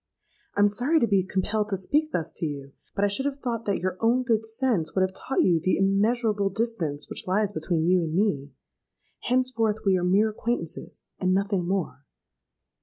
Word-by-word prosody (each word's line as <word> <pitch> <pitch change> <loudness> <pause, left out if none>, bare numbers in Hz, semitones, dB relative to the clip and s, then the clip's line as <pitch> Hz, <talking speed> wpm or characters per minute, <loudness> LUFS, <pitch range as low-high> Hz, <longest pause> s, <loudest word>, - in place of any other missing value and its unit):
I - - +4
am 205 - +7
sorry 250 +10 +2
to 235 - +3
be 200 -2 +3
compelled 205 +3 -1
to 195 - 0
speak 300 +11 0
thus 165 -1 -2
to - - -2
you; 140 -2 -7 0.2
but 200 - +2
I - - +3
should 235 +8 -1
have 280 -1 -3
thought 235 -4 -3
that 200 - +1
your 185 +1 -2
own 240 +3 +2
good 225 -3 +1
sense 225 - -1
would 190 - +2
have 185 0 -1
taught 270 - 0
you 170 -3 +3
the 185 +4 +1
immeasurable 205 +1 +1
distance 195 -9 -2
which - - -5
lies 200 +2 +1
between 175 -5 -1
you 180 +1 +4
and 160 -1 -3
me. 165 -9 0 0.7
Henceforth 235 -4 0
we 195 -1 +4
are - - -3
mere 200 +5 +3
acquaintances, 215 -6 -5
and 185 0 +2
nothing 195 -2 0
more.' 185 -7 -2
200 Hz, 195 wpm, -26 LUFS, 185-230 Hz, 0.7 s, am